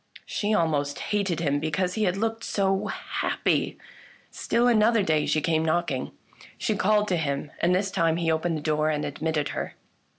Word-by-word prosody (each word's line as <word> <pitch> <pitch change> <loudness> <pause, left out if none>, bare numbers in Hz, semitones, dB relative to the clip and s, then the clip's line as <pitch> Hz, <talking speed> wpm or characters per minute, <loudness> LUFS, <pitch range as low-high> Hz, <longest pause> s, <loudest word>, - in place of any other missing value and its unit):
She 210 0 -2
almost 145 -7 +1 0.2
hated 190 -5 0
him 145 -3 +1
because 180 +4 -1
he 215 +1 0
had 180 0 0
looked 225 +2 -2
so 195 -1 0
happy. - - -1 0.5
Still 240 +1 +1
another 225 -2 +4
day 155 -3 +1
she 155 - +2
came 160 0 +1
knocking. 165 +2 0 0.5
She 215 - 0
called 210 +2 +2
to 180 - +2
him, 140 -2 -2
and 175 +1 +3
this 195 +1 0
time 165 -2 +1
he 165 -1 +1
opened 160 +1 0
the - - -6
door 155 0 +1
and 150 -1 -1
admitted 150 0 -2
her. - - -4
170 Hz, 175 wpm, -26 LUFS, 155-200 Hz, 0.5 s, another